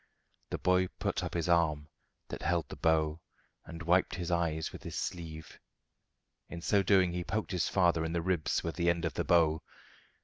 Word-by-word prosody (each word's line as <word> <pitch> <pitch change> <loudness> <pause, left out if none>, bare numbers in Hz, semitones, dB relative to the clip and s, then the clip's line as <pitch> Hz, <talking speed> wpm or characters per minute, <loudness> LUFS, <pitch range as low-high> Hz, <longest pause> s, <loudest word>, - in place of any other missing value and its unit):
The - - -2
boy 90 0 +2
put - - -1
up - - -4
his 85 -1 -1
arm, 80 -4 +2 0.4
that - - -6
held 85 -3 0
the - - -7
bow, 80 0 +1 0.4
and 85 0 -8
wiped 90 +3 +2
his 90 -1 -4
eyes 80 -2 0
with - - -10
his - - -7
sleeve. 80 -4 -6 0.9
In 85 - -6
so 100 +4 +2
doing 95 -2 +4
he 90 0 -3
poked 110 +4 -3
his 90 -3 0
father 85 -3 +3
in 80 0 -3
the 85 -1 -1
ribs 90 -3 0
with 85 - -4
the 85 -1 +2
end 85 0 0
of 80 - -1
the - - -1
bow. 80 -2 +3
85 Hz, 195 wpm, -31 LUFS, 80-90 Hz, 0.9 s, doing